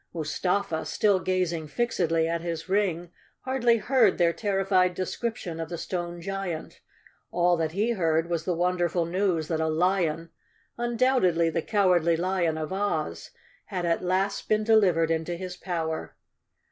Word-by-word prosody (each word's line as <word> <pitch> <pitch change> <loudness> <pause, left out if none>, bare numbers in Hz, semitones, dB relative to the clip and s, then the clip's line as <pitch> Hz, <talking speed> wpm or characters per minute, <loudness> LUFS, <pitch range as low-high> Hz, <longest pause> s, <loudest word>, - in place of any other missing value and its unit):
Mustafa, 170 +1 -1
still 200 -3 +2
gazing 180 -4 -1
fixedly 165 -4 0
at 170 0 -1
his 165 -1 -4
ring, 180 -4 0 0.3
hardly 245 -3 +2
heard 235 -3 +3
their 170 -1 +3
terrified 190 0 +1
description 185 -3 -4
of 165 -1 -4
the 175 - -4
stone 175 0 -4
giant. 195 -3 -5 0.5
All 175 0 +2
that 160 -1 -1
he 210 +5 +1
heard 165 -6 +1
was 170 -2 -2
the 180 0 -1
wonderful 175 -1 +1
news 175 -2 0
that 160 -2 0
a 160 - +1
lion, 165 -1 0 0.4
undoubt¬ 240 +2 +1
edly 165 -1 +1
the 165 - 0
Cowardly 180 -5 +2
Lion 175 -2 0
of 155 +3 -4
Oz, 155 - -2 0.4
had 180 -2 -3
at 170 +1 0
last 190 +2 -1
been 215 0 +2
deliv¬ 215 -6 +5
ered 165 0 +1
into 165 +2 -1
his 180 +1 -6
power. 165 -4 -4
175 Hz, 155 wpm, -27 LUFS, 165-195 Hz, 0.5 s, deliv¬